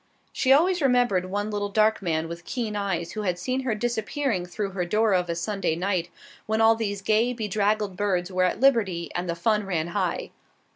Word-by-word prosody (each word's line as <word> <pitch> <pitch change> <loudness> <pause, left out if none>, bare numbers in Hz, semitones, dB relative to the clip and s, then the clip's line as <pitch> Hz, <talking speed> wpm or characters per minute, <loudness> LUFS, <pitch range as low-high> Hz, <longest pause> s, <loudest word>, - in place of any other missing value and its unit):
She 260 - +1
always 345 +5 +4
remembered 245 -9 +2
one 205 +2 -2
little 205 -1 -2
dark 215 +1 +2
man 165 -3 -1
with 170 +1 -8
keen 225 -1 -3
eyes 190 -5 -2
who 215 - -4
had 180 -4 -1
seen 255 +9 -2
her 255 -4 -1
disappearing 230 -2 -1
through 195 +2 -4
her 185 -1 -2
door 215 +4 +2
of 180 -1 +1
a 170 - -1
Sunday 180 -1 -1
night 180 -1 -1 0.4
when 220 0 0
all 225 0 +6
these 205 -3 -3
gay, 220 +4 +2
bedraggled 210 -2 0
birds 185 -2 -1
were 185 0 +2
at 180 - -1
liberty 210 -10 +2
and 175 0 -3
the 170 - -1
fun 210 +5 +1
ran 170 -4 -2
high. 185 -1 -2
205 Hz, 200 wpm, -25 LUFS, 180-225 Hz, 0.4 s, all